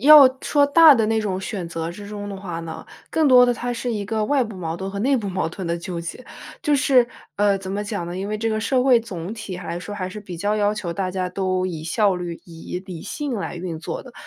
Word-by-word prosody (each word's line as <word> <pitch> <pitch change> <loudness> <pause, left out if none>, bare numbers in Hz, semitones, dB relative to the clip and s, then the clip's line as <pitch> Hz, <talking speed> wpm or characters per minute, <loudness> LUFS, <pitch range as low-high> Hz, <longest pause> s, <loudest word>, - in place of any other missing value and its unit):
要 290 +1 +10
说 290 -1 +3
大 315 0 +8
的 225 -3 +2
那 220 0 +1
种 190 -3 -2
选 190 -4 -4
择 165 0 -4
之 205 +2 -9
中 205 -1 -6
的 200 - -5
话 175 -4 -5
呢， 165 -1 -7 0.3
更 315 -3 +3
多 250 -1 +8
的 245 - +3
它 245 +1 -3
是 240 0 -3
一 205 -2 -2
个 215 0 -1
外 280 +2 +2
部 215 -3 -8
矛 165 -2 -4
盾 190 +1 -5
和 200 - -5
内 270 +4 +3
部 205 -4 -3
矛 185 -3 -1
盾 180 +1 -6
的 170 0 0
纠 170 0 -5
结。 170 +9 -7 0.4
就 300 -3 +2
是 255 -3 +4 0.3
呃， 200 -1 +3
怎 190 0 -7
么 205 +1 -2
讲 205 -5 -3
呢？ 175 +1 -5
因 195 +2 -3
为 215 0 -2
这 225 +1 0
个 215 0 0
社 250 +3 +2
会 250 -3 +6
总 195 -3 -6
体 215 -5 -6
来 175 -1 -5
说 205 +3 -6
还 185 -2 -3
是 210 +3 -8
比 185 -4 -8
较 205 +5 0
要 205 0 +2
求 180 -5 -4
大 185 0 -2
家 185 -1 -2
都 185 0 -1
以 160 -4 -5
效 200 +3 +2
率、 175 -2 -5
以 165 +1 -7
理 175 -4 -7
性 290 -4 -4
来 195 -3 -4
运 170 -2 -5
作 160 - -5
的。 255 - -13
200 Hz, 285 characters per minute, -22 LUFS, 180-230 Hz, 0.4 s, 要